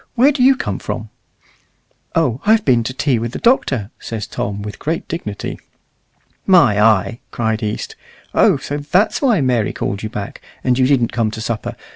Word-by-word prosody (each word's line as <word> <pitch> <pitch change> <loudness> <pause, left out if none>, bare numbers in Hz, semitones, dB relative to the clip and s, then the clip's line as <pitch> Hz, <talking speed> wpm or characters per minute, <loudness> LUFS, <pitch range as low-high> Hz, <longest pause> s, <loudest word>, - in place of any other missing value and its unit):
where 260 +4 +5
do 270 - -2
you 265 +2 +6
come - - -3
from?" - - -5 1.0
"Oh, 135 -7 +1
I've 220 +1 +3
been 120 -4 +3
to 130 - -2
tea 135 -3 +1
with 115 +1 -4
the - - -3
Doctor," 130 - +1
says 110 -3 -5
Tom, 100 0 -4
with 105 -1 -7
great 165 +2 -3
dignity. 105 -11 -5 0.9
"My 135 - +5
eye!" 110 +2 +3
cried 110 -2 -1
East, 105 -1 -4 0.4
"Oh! - - +4
so 145 +2 -4
that's 175 +8 +1
why 240 - +3
Mary 125 -5 +1
called 100 +1 -3
you 110 - -4
back, 105 -1 -6 0.2
and 125 0 +2
you 130 - +4
didn't 130 -4 +2
come 115 -2 +1
to 110 - -7
supper. 115 -1 -3
125 Hz, 180 wpm, -18 LUFS, 110-165 Hz, 1.0 s, you